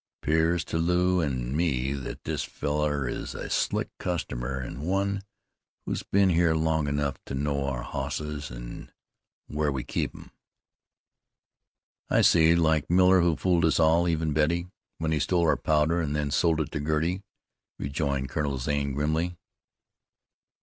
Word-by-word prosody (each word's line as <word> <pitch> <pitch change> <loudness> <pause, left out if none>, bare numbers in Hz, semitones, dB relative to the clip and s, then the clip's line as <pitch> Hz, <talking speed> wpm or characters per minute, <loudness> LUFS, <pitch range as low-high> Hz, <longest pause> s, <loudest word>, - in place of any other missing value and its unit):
"'Pears 80 +2 +2
to 80 - -2
Lew 90 +2 +2
an' 65 -4 -2
me 70 -5 0
that 70 -2 -6
this - - -2
fellar 75 -2 -1
is - - -4
a - - -6
slick - - 0
customer, 65 -7 -3
an' 65 +1 -6
one 100 +4 0 0.6
who's - - -2
been 100 -1 +3
here 85 -2 +3
long 80 -1 +1
enough 70 -1 -1
to 65 - -5
know 70 0 -1
our 65 -3 -3
hosses 75 +1 -4
an' - - -8 0.5
where 75 -1 -1
we 65 -3 -3
keep - - -2
them." - - -13 1.8
"I - - +4
see. 80 0 +5
Like 80 -3 +2
Miller, 90 +1 +5
who 85 -2 +3
fooled 85 +3 +1
us 80 0 +3
all, 85 +2 +4
even 80 -2 0
Betty, 85 +4 +1 0.3
when 80 -1 -1
he 80 - +1
stole 85 +3 +2
our - - +4
powder 80 +2 +2
and 75 -2 -2
then 75 -1 -1
sold 80 +3 +2
us 75 - -3
to - - -4
Girty," 80 +5 0 0.6
rejoined 70 -2 -2
Colonel 70 -1 -1
Zane 70 +1 -1
grimly. 80 +5 -1
75 Hz, 155 wpm, -27 LUFS, 70-85 Hz, 1.8 s, see